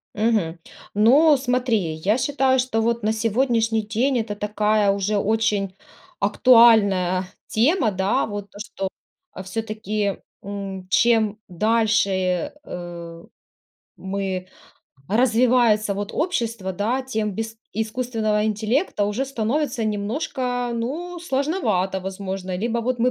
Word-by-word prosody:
Мгм. 210 Hz, -7 st, 0 dB, 0.3 s
Ну, 275 Hz, +9 st, +5 dB
смотри, 250 Hz, -3 st, +1 dB, 0.2 s
я 195 Hz, +8 st, +1 dB
считаю, 265 Hz, 0 st, +2 dB
что, 250 Hz, -3 st, 0 dB
вот, 235 Hz, -1 st, 0 dB
на 215 Hz, -, +2 dB
сегодняшний 225 Hz, 0 st, +1 dB
день 235 Hz, +5 st, 0 dB
это 220 Hz, -2 st, -3 dB
такая 210 Hz, 0 st, +1 dB
уже 200 Hz, +1 st, 0 dB
очень 205 Hz, -2 st, 0 dB, 0.4 s
актуальная 200 Hz, -5 st, +5 dB, 0.2 s
тема. 240 Hz, -, +2 dB
Да, 190 Hz, +1 st, +1 dB
вот, 205 Hz, -1 st, -6 dB
то, 205 Hz, -, -13 dB
что, 195 Hz, -3 st, -4 dB, 0.4 s
а, -, -, -8 dB
всё-таки, 210 Hz, 0 st, -3 dB, 0.3 s
м, 195 Hz, -2 st, -6 dB
чем 220 Hz, -1 st, +3 dB
дальше, 220 Hz, +3 st, +2 dB, 0.5 s
э, 170 Hz, -3 st, -8 dB, 0.7 s
мы, 190 Hz, -1 st, -3 dB, 0.6 s
развивается, 230 Hz, -2 st, +3 dB
вот, 205 Hz, +1 st, -4 dB
общество, 230 Hz, -, -2 dB
да, 225 Hz, +8 st, -1 dB
тем 220 Hz, -5 st, -2 dB
без 225 Hz, +3 st, -5 dB, 0.2 s
искусственного 220 Hz, -1 st, -1 dB
интеллекта 220 Hz, -, 0 dB
уже 210 Hz, +6 st, -1 dB
становится 265 Hz, +1 st, -1 dB
немножко, 245 Hz, +3 st, -2 dB
ну, 310 Hz, +10 st, -4 dB
сложновато 265 Hz, -, 0 dB
возможно, 190 Hz, -1 st, -5 dB
либо 230 Hz, +4 st, -1 dB
вот 245 Hz, +1 st, -1 dB
мы 250 Hz, +2 st, +3 dB
220 Hz, 115 wpm, -22 LUFS, 200-245 Hz, 0.7 s, Ну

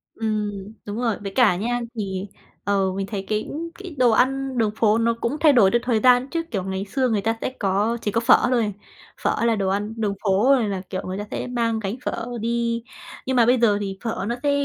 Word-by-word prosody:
Ừm, 210 Hz, -2 st, -3 dB
đúng 205 Hz, +1 st, -5 dB
rồi. 230 Hz, -4 st, +1 dB
Với 195 Hz, -, -4 dB
cả 230 Hz, -8 st, +5 dB
nha, 240 Hz, +6 st, -1 dB, 0.2 s
thì, 195 Hz, -2 st, -3 dB, 0.4 s
ờ, 195 Hz, -2 st, +1 dB
mình 195 Hz, 0 st, -3 dB
thấy 195 Hz, -3 st, -4 dB
cái 215 Hz, 0 st, -2 dB, 0.3 s
cái 370 Hz, -6 st, -8 dB
đồ 245 Hz, -2 st, +4 dB
ăn 265 Hz, +2 st, +1 dB
đường 220 Hz, -2 st, +2 dB
phố 220 Hz, -1 st, +3 dB
nó 230 Hz, 0 st, +2 dB
cũng 280 Hz, +6 st, -1 dB
thay 305 Hz, -3 st, +6 dB
đổi 205 Hz, -7 st, +5 dB
theo 240 Hz, -, +3 dB
thời 235 Hz, -3 st, +1 dB
gian 250 Hz, +2 st, +4 dB
chứ, 330 Hz, +2 st, -2 dB
kiểu, 195 Hz, -5 st, -1 dB
ngày 190 Hz, +1 st, -3 dB
xưa 255 Hz, +4 st, 0 dB
người 210 Hz, -3 st, +1 dB
ta 225 Hz, +1 st, 0 dB
sẽ -, -, -1 dB
có 205 Hz, +4 st, +1 dB
chỉ 210 Hz, -, -1 dB
có 230 Hz, -, +1 dB
phở 230 Hz, -, +6 dB
thôi. 225 Hz, -5 st, +1 dB, 0.5 s
Phở 235 Hz, -, +1 dB
là 230 Hz, -, +3 dB
đồ 195 Hz, -2 st, -1 dB
ăn 205 Hz, +3 st, -1 dB
đường 210 Hz, -3 st, 0 dB
phố 195 Hz, +1 st, +2 dB
rồi 230 Hz, -6 st, 0 dB
là, 190 Hz, -2 st, -3 dB
kiểu, 185 Hz, -, -3 dB
người 185 Hz, +1 st, -4 dB
ta 205 Hz, -, -3 dB
sẽ -, -, -3 dB
mang 230 Hz, -2 st, 0 dB
gánh 205 Hz, +1 st, -3 dB
phở 225 Hz, -, -2 dB, 0.2 s
đi. 235 Hz, 0 st, -1 dB, 0.4 s
Nhưng 260 Hz, 0 st, -1 dB
mà 235 Hz, -2 st, +5 dB
bây 250 Hz, +2 st, +4 dB
giờ 210 Hz, -4 st, +4 dB
thì 195 Hz, -1 st, -4 dB
phở 225 Hz, -4 st, -2 dB
nó 235 Hz, -, -1 dB
sẽ 285 Hz, -, +3 dB
225 Hz, 240 wpm, -23 LUFS, 200-240 Hz, 0.5 s, thay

